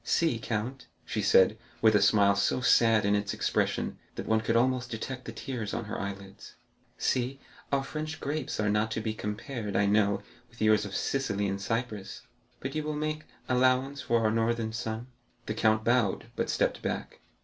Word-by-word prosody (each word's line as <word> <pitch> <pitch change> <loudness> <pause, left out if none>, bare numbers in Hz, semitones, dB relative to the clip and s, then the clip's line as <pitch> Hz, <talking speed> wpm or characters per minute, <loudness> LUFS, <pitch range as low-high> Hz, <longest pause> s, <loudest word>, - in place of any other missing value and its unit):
"See, 160 -9 +1
count," 115 +4 -3 0.2
she - - -2
said, 100 +4 +5 0.2
with 110 -1 +5
a 105 - +4
smile 100 0 +5
so 100 +5 +1
sad 115 -3 +4
in 100 - +3
its 105 -1 0
expression - - 0 0.2
that - - -5
one 110 0 +2
could 115 +1 0
almost 125 +1 +2
detect 125 +3 -5
the - - -5
tears 120 -7 -4
on 115 - -3
her 110 - -4
eyelids—"see, 100 +6 -4 0.3
our 140 -1 +2
French 155 +2 -5
grapes 145 -4 -3
are 105 - +1
not 105 +1 +1
to - - -1
be 110 0 -2
compared, 110 +1 -4
I 100 - +3
know, 100 -1 +2 0.3
with 120 +1 -19
yours 110 -1 +4
of 95 -2 -6
Sicily 105 -7 0
and 100 0 -2
Cyprus, 105 -2 -3 0.4
but 130 +1 -4
you 155 - -1
will 150 0 -3
make 155 +1 -2 0.2
allowance 130 +2 +2
for 115 -1 +1
our 110 -1 +2
northern 115 0 0
sun." 110 +1 -3 0.4
The - - -2
count 110 0 +2
bowed, 120 -4 +1
but - - -1
stepped - - +1
back. - - -4
115 Hz, 180 wpm, -29 LUFS, 105-130 Hz, 0.4 s, said